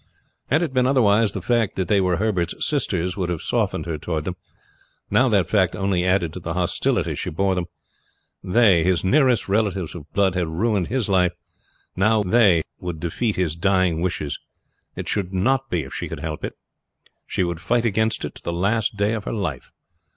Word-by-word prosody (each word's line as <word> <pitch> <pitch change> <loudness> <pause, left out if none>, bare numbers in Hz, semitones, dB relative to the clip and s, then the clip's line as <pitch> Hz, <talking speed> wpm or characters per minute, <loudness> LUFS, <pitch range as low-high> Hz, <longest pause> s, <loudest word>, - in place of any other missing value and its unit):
Had 155 +6 +3
it 155 -6 -3
been 125 -1 +3
otherwise 115 -5 +3
the - - -5
fact 115 -4 +1
that 95 -2 -1
they 100 0 +3
were 90 -2 +1
Herbert's 95 -4 0
sisters 90 - -1
would 90 -3 -2
have 85 -3 -3
softened - - -1
her 80 -3 -4
toward 80 -1 -3
them; 90 +3 -4 0.8
now 130 0 +4
that 100 -6 +2
fact 95 -4 +2
only 95 -3 0
added 90 -3 +1
to - - -6
the 85 -1 -5
hostility 90 -1 0
she - - -4
bore 95 +5 0
them. 90 -2 -2 0.8
They, 95 -4 +4
his 90 -1 +1
nearest 125 +1 +3
relations 100 -4 0
of 80 -3 -10
blood, 100 -2 +2
had 90 -2 -1
ruined 95 +3 0
his 125 -2 -1
life; 90 -3 +2 0.6
now 110 +3 +3
they 95 -5 +4 0.2
would 90 -3 -5
defeat 100 +7 -1
his 85 -4 -1
dying 95 -2 +1
wishes. 85 -5 -2 0.6
It - - -6
should 95 -2 -1
not 135 +7 +1
be 85 -3 -1
if 65 - -10
she - - -4
could - - -6
help 80 -1 -5
it. - - -3 0.7
She - - 0
would 85 -2 -2
fight 120 +6 +1
against 110 0 0
it - - -6
to - - -13
the - - -2
last 105 +5 0
day 105 +2 +1
of 110 -3 -4
her - - -3
life. 85 - -4
95 Hz, 195 wpm, -22 LUFS, 85-110 Hz, 0.8 s, now